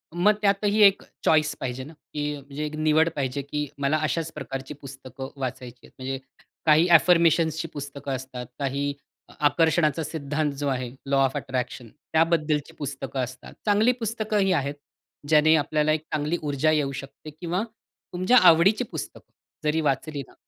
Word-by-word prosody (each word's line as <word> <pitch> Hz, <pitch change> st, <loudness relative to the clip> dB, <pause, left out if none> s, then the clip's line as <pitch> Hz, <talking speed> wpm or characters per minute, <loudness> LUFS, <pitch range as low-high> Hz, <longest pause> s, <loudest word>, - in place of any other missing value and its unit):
मग 205 Hz, +5 st, +4 dB
त्यातही 205 Hz, +1 st, +2 dB
1 200 Hz, -1 st, +6 dB, 0.2 s
चॉईस 155 Hz, -1 st, +3 dB
पाहिजे 130 Hz, 0 st, -4 dB
ना, 155 Hz, -, -11 dB, 0.2 s
की 150 Hz, 0 st, -2 dB
म्हणजे 140 Hz, +2 st, -6 dB
एक 150 Hz, 0 st, -5 dB
निवड 155 Hz, +1 st, +3 dB
पाहिजे 140 Hz, -1 st, -2 dB
की 150 Hz, +1 st, -3 dB
मला 140 Hz, +2 st, +2 dB
अशाच 160 Hz, +2 st, -1 dB
प्रकारची 135 Hz, -1 st, -6 dB
पुस्तकं 135 Hz, -1 st, -9 dB
वाचायची 125 Hz, -1 st, -5 dB
आहेत. -, -, -18 dB
म्हणजे 135 Hz, +1 st, -3 dB, 0.5 s
काही 155 Hz, +2 st, +5 dB
अ, 175 Hz, -, +4 dB
अफर्मेशन्सची 165 Hz, -2 st, +4 dB
पुस्तकं 140 Hz, -1 st, -6 dB
असतात. 130 Hz, -1 st, -7 dB
काही 140 Hz, +1 st, -1 dB, 0.5 s
आकर्षणाचा 160 Hz, 0 st, +2 dB
सिद्धांत 150 Hz, 0 st, -2 dB
जो 145 Hz, 0 st, -2 dB
आहे 130 Hz, -2 st, -1 dB, 0.2 s
लॉ 140 Hz, 0 st, +1 dB
ऑफ 135 Hz, -, 0 dB
अट्रॅक्शन 125 Hz, -2 st, -4 dB, 0.3 s
त्याबद्दलची 160 Hz, -1 st, +1 dB
पुस्तकं 135 Hz, -1 st, -5 dB
असतात. 130 Hz, +2 st, -8 dB
चांगली 210 Hz, +3 st, +4 dB
पुस्तकंही 215 Hz, -4 st, 0 dB
आहेत, 140 Hz, -3 st, -1 dB, 0.5 s
ज्याने 155 Hz, +1 st, +5 dB
आपल्याला 150 Hz, 0 st, +1 dB
एक 155 Hz, 0 st, +1 dB
चांगली 155 Hz, +3 st, 0 dB
ऊर्जा 150 Hz, +1 st, +1 dB
येऊ 145 Hz, -3 st, +1 dB
शकते 140 Hz, +2 st, -12 dB
किंवा 180 Hz, +3 st, -1 dB, 0.5 s
तुमच्या 185 Hz, +8 st, +4 dB
आवडीची 185 Hz, +6 st, +6 dB
पुस्तकं -, -, -7 dB, 0.3 s
जरी 155 Hz, +1 st, +1 dB
वाचली 145 Hz, 0 st, -1 dB
ना -, -, -19 dB
150 Hz, 150 wpm, -25 LUFS, 140-165 Hz, 0.5 s, 1